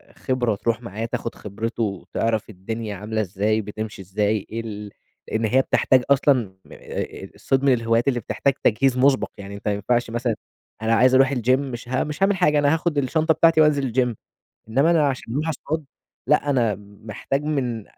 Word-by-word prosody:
خبرة 125 -4 0
تروح 115 +3 -1
معاه 115 -1 -5
تاخُد 115 0 -4
خبرته 115 +3 -4
وتعرف 110 +2 -2
الدنيا 110 +2 -5
عاملة 110 +3 -2
إزاي 105 +3 0
بتمشي 105 0 -6
إزاي 105 +2 -1
إيه 115 +1 -4
ال 105 -2 -7 0.4
لإن 110 0 -1
هي 130 +5 +4
بتحتاج 130 0 +3
أصلًا 135 -7 +3
م - - -19
آآ - - -6
الصيد 135 0 0
من 140 -2 +5
الهوايات 115 0 +1
اللي 125 -3 +2
بتحتاج 135 +4 0
تجهيز 130 +3 +3
مُسبَق، 135 +1 +3
يعني 100 0 -8
أنت 100 - -8
ما 105 - +2
ينفعش 120 +4 0
مثلًا 120 0 -1 0.5
أنا 110 +1 +1
عايز 130 +2 +5
أروح 135 +1 +5
الgym 125 -2 -2
مش 125 -3 -6
ه 130 +1 +1
مش 150 +5 -3
هاعمل 195 0 +3
حاجة، 150 -4 +3
أنا 145 +1 +3
هاخُد 160 -1 -1
الشنطة 155 +4 +2
بتاعتي 165 0 +4
وأنزل 145 -4 +3
الgym، 125 -2 +1 0.5
إنّما 135 +8 +3
أنا 155 -4 +4
عشان 125 -4 -4
أروح 155 +4 -1
أصطاد، 160 +1 -3 0.4
لأ 145 +1 +2
أنا 120 -6 +2
محتاج 105 +6 -5
من 125 -8 -2
120 Hz, 185 wpm, -23 LUFS, 110-140 Hz, 0.5 s, من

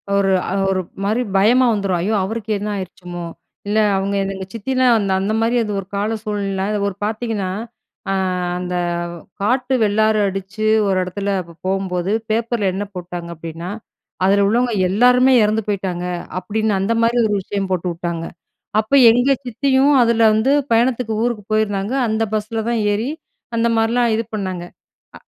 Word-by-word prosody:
ஒரு 195 -1 +2 0.2
அ - - -1 0.2
ஒரு 190 -1 +1 0.2
மாரி 220 +5 +1
பயமா 240 +6 +5
வந்துரும். 195 -3 0
ஐயோ! 215 +4 0
அவருக்கு 220 +2 -4
என்ன 210 +1 -3
ஆயிருச்சுமோ? 180 -2 -7 0.4
இல்ல 210 +1 0 0.2
அவுங்க 200 +1 -1
எந் 195 0 -2
எங்க 190 0 -6
சித்திதான் 255 +2 +2
அந்த 195 -2 -1
அந்த 200 +3 -1
மாதிரி 235 +2 +2
அது 210 - -4
ஒரு 190 - -7
கால 210 +3 -1
சூழ்நிலைல 200 -2 -2
அத 210 - -1
ஒரு 190 - -4
பாத்தீங்கன்னா, 215 -4 -2 0.6
அ - - +1 0.4
அந்த 180 0 -4 0.7
காட்டு 255 +4 +1
வெள்ளாறு 215 +1 +2
அடிச்சு 195 +3 -4 0.2
ஒரு 190 -1 +1
எடத்துல 200 +2 -4 0.4
போம்போது, 190 -1 -1 0.2
பேப்பர்ல 225 -3 0
என்ன 205 +2 -3
போட்டாங்க 175 -1 -6
அப்டீன்னா, 165 +2 -7 0.6
"அதுல 200 +1 +4
உள்ளவங்க 240 +2 +1 0.2
எல்லாருமே 250 +5 +5
எறந்து 215 +1 +1
போயிட்டாங்க" 185 -3 -2 0.4
அப்டின்னு, 215 +1 -1
அந்த 230 +4 +1
மாதிரி 240 +1 +2
ஒரு 210 - -1
விஷயம் 195 -1 -3
போட்டு 180 0 0
வுட்டாங்க. 170 -1 -4 0.6
அப்ப 220 +6 -9 0.2
எங்க 245 +4 +3
சித்தியும் 270 +3 +2
அதுல 230 0 +2
வந்து, 220 +6 +2 0.2
பயணத்துக்கு 235 -1 +1
ஊருக்கு 230 -5 -2
போயிருந்தாங்க, 210 +2 0
அந்த 220 +1 0
பஸ்ல 220 +1 -2
தான் 230 -2 0
ஏறி 225 +6 -1 0.5
அந்த 230 +1 +2
மாரிலாம் 230 +1 +2
இது 225 - -1
பண்ணாங்க. 185 -4 -3 0.5
அ, - - -17
210 Hz, 155 wpm, -19 LUFS, 195-230 Hz, 0.7 s, பயமா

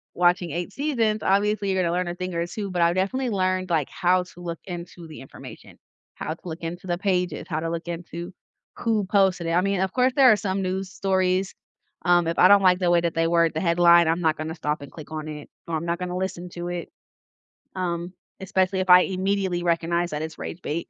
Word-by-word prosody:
watching 175 -1 +2
8 175 +4 -4
seasons, 230 -7 0
obviously, 200 0 +1
you're 190 -1 +1
gonna 170 -1 0
learn 180 0 -1
a 175 - -4
thing 185 0 -5
or 170 0 -1
2, 200 +2 -5
but 175 -1 -1
I've 170 +1 +3
definitely 245 +7 0
learned, 185 -2 0
like, 155 -5 0
how 180 0 +2
to 180 0 -15
look 170 -1 -5
into 175 -2 -8
the 155 - -10
information, 135 - -12 0.4
how 155 - -4
to - - -16
look 160 - -6
into 175 +3 -6
the 175 0 -1
pages, 180 -2 -1
how 160 -3 -2
to 165 - -2
look 170 +1 -4
into 170 +1 -6 0.4
who 220 -4 0
posted 190 -3 +2
it. - - 0
I 175 +2 +3
mean, 195 -1 0
of 190 -1 -1
course, 255 0 +2
there 265 -4 +7
are - - +6
some 195 -2 -2
news 185 0 -2
stories, 190 -1 0 0.5
um, 175 -1 +4
if 165 - -2
I 180 - +8
don't 200 -1 +7
like 180 0 +5
the 180 - +1
way 170 -1 +4
that 170 -1 -1
they 165 0 +1
word 170 -1 +3
the 160 - -2
headline, 170 -1 +5
I'm 165 +2 +1
not 160 -2 +1
gonna 160 +1 -5
stop 150 -2 -2
and 140 - -10
click 155 -1 -11
on 155 0 -5
it 150 -1 -8 0.2
or 165 - -2
I'm 170 - -5
not 170 +1 -2
gonna 180 0 -3
listen 180 -1 -4
to 175 0 -5
it, 175 -1 -5 0.9
um, 175 -1 -3 0.3
especially 190 0 0
if 185 -1 -1
I 180 - +10
immediately 190 -1 -1
recognize 170 0 0
that 150 0 -3
it's 160 0 -6
rage 180 - -7
bait. 165 +3 -3
180 Hz, 235 wpm, -24 LUFS, 170-190 Hz, 0.9 s, I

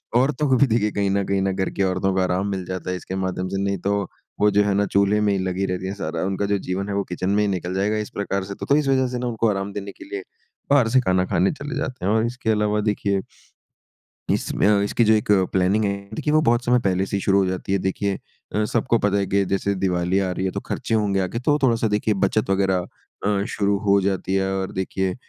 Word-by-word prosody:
औरतों 135 +4 +2
को 130 - +5
भी 140 - +4
देखिए 110 -2 +1
कहीं 100 -1 0
न 100 0 +1
कहीं 100 0 0
ना 95 0 +1
घर 95 0 -1
की 100 - -1
औरतों 95 +1 0
को 95 - 0
आराम 95 +2 0
मिल 95 -2 -3
जाता 95 0 -5
है - - -1
इसके 95 - -6
माध्यम 95 -1 -2
से, 95 - -3
नहीं 100 -1 0
तो 100 +3 0 0.4
वो 105 - +5
जो 105 0 +4
है 100 -1 +1
ना 100 +1 +2
चूल्हे 100 +1 +2
में 105 -1 +2
ही 95 - 0
लगी 95 +1 -1
रहती 90 0 -3
है 95 - -3
सारा। 80 -4 -4
उनका 95 +1 -1
जो 100 0 +1
जीवन 95 +2 -3
है - - -2
वो 100 - 0
किचन 90 +1 -2
में 105 +1 +2
ही - - +1
निकल 90 -2 -2
जाएगा 100 +3 0
इस 105 -1 -3
प्रकार 100 -1 -2
से। 100 +1 -7
तो - - -6
तो 140 - +3
इस 150 -2 0
वजह 130 -1 +3
से 125 0 -4
ना 125 - -2
उनको 115 -1 0
आराम 100 0 -2
देने 100 -1 -5
के - - -13
लिए 395 +5 -6 0.5
बाहर 140 -5 +5
से 130 +3 +4
खाना 95 -3 +1
खाने 90 +1 +2
चले 145 0 -6
जाते 130 -8 -4
हैं 100 - +2
और 110 +1 +2
इसके 120 -1 -3
अलावा 105 0 +1
देखिए, 100 -2 0 1.1
इसमें - - 0
अ, 105 -1 +4
इसकी 105 +3 +1
जो 110 - +5
एक 105 -1 +1 0.2
प्लानिंग 95 +3 +2
है 100 - +1 0.2
देखिए 150 +5 -1
वो 155 - +5
बहुत 120 -1 +2
समय 125 0 +4
पहले 95 0 +1
से 100 - -4
ही - - -3
शुरू 100 0 +3
हो 95 - +2
जाती 95 +1 -2
है। 100 - +2
देखिए 95 +1 -1 0.4
अ, 105 - +2
सबको 120 +2 +1
पता 100 0 +1
है 100 - +1
कि 100 0 +2
जैसे 100 +1 0
दिवाली 90 0 0
आ 95 -1 0
रही 95 +1 -2
है 95 - 0
तो - - -3
खर्चे - - -2
होंगे 100 -3 +1
आगे 95 +5 -2
तो 145 +3 +2
थोड़ा-सा 115 -3 +3
देखिए 105 +1 +1
बचत 100 +2 0
वग़ैरह 95 -2 +1 0.4
अ, 100 -1 +1
शुरू 100 -1 0
हो 100 0 +5
जाती 95 0 -1
है 95 0 +1
और 95 - -3
देखिए 95 0 -2
100 Hz, 265 wpm, -23 LUFS, 95-105 Hz, 1.1 s, को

